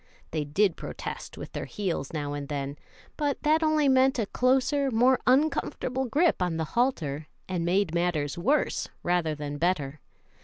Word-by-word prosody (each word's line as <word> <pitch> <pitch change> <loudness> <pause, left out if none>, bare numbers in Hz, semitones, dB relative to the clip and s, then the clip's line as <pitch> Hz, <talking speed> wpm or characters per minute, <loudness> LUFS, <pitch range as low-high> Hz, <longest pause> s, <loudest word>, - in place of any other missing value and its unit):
They 155 -1 -1
did 180 +5 +2
protest - - -7
with - - -8
their - - -4
heels 175 -9 -3
now 145 -2 -3
and 145 -1 -5
then, 140 -1 -4 0.4
but 290 -2 -1
that 310 +1 +3
only 310 -2 +3
meant 265 0 +4
a 225 - +1
closer, 265 +5 +2
more 250 +2 +4
uncomfortable 265 -1 +1
grip 300 - +2
on 175 -3 0
the 160 - -1
halter, 160 - 0 0.2
and 180 -3 -2
made 180 0 +1
matters 170 -4 0
rather 170 - -7 0.2
worse - - -4 0.2
than 155 -4 -1
better. 155 -5 0
180 Hz, 160 wpm, -27 LUFS, -, 0.4 s, meant